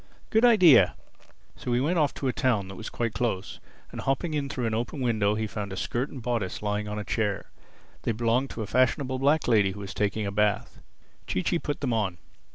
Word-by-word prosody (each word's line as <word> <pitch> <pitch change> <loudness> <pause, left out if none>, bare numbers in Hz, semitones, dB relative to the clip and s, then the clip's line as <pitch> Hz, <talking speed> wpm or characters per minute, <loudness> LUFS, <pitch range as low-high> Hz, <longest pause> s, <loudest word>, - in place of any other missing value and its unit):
Good 220 +1 +3
idea!" 175 - +7 0.6
So 125 - -3
he 120 - +3
went 165 +6 +1
off 150 -2 +3
to 135 - -2
a 125 - +1
town 105 -7 +1
that 95 - -8
was 110 - -6
quite 115 -2 -2
close, 110 -3 -2 0.3
and - - -6
hopping 135 +4 -1
in 145 -2 -1
through 125 -3 -3
an 110 - -1
open 120 +6 -2
window 110 -5 +1
he 110 0 -1
found 105 -2 -5
a 95 - -5
skirt 125 +8 -2
and 130 -4 -9
bodice 115 -6 -2
lying 105 0 -1
on 105 0 -4
a 105 - -3
chair. 105 -2 -2 0.5
They - - 0
belonged 120 +4 +1
to 110 - -5
a - - -4
fashionable 130 +4 +1
black 145 +4 +2
lady 105 -5 +3
who 105 - -9
was 100 -1 -6
taking 105 +1 -1
a 100 - -2
bath. 105 0 0 0.5
Chee 90 - -1
Chee 170 - +1
put 145 -2 -4
them 130 -4 0
on. 100 -6 -1
115 Hz, 225 wpm, -27 LUFS, 105-135 Hz, 0.6 s, idea